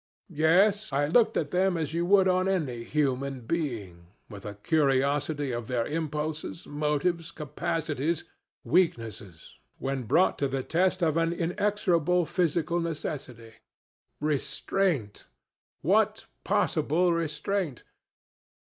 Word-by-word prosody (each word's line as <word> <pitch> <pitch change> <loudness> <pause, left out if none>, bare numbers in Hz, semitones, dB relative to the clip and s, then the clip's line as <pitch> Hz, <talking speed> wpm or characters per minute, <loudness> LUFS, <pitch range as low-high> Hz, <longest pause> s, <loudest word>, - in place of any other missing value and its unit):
Yes; 185 +6 +3
I 140 +2 +2
looked 220 +8 +3
at 145 -3 -1
them 185 0 +2
as 160 -2 -3
you 170 +1 0
would 195 0 +5
on 185 0 +2
any 145 -12 -1
human 135 -1 -1
being, 115 - -4 0.2
with 100 -2 -10
a 105 - -6
curiosity 145 - +1
of 120 -2 -4
their 120 -2 0
impulses, 155 +1 -3
motives, 150 +3 -1
capacities, 155 0 -2 0.4
weaknesses, 110 - -1 0.2
when 135 -2 -3
brought 170 - +3
to 140 - +1
the 135 -1 -2
test 185 +3 +1
of 160 -1 +2
an 165 0 +2
inexorable 180 -1 +1
physical 170 0 0
necessity. 135 -8 -5 0.7
Restraint! 150 - -1 0.6
What - - +2 0.2
possible 175 +4 +2
restraint? 165 -1 -2
155 Hz, 115 wpm, -28 LUFS, 135-175 Hz, 0.7 s, would